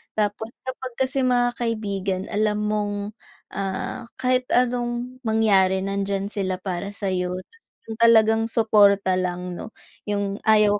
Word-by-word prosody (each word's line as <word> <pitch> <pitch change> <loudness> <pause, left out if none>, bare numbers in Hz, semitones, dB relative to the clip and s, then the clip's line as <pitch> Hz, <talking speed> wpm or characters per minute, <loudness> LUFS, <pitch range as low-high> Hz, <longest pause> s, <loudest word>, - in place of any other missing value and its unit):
Tapos 210 +1 -1 0.2
kapag 260 -1 -6
kasi 265 +1 0
mga 245 -1 +3
kaibigan 200 -5 -2
alam 210 0 +1
mong, 210 -1 0 0.6
ah, 195 +5 -4
kahit 255 0 +1
anong 245 0 0
mangyari 195 -4 +3
nandiyan 195 0 -2
sila 190 -3 -1
para 190 +1 -4
sa'yo. 180 -3 -1
Tapos 455 0 -30
yung 220 - -6
talagang 225 -1 +5
suporta 205 -4 +4
lang 180 0 -3
'no? 220 - -8 0.4
Yung 200 0 -1
ayaw 210 -1 +5
210 Hz, 130 wpm, -23 LUFS, 195-230 Hz, 0.6 s, talagang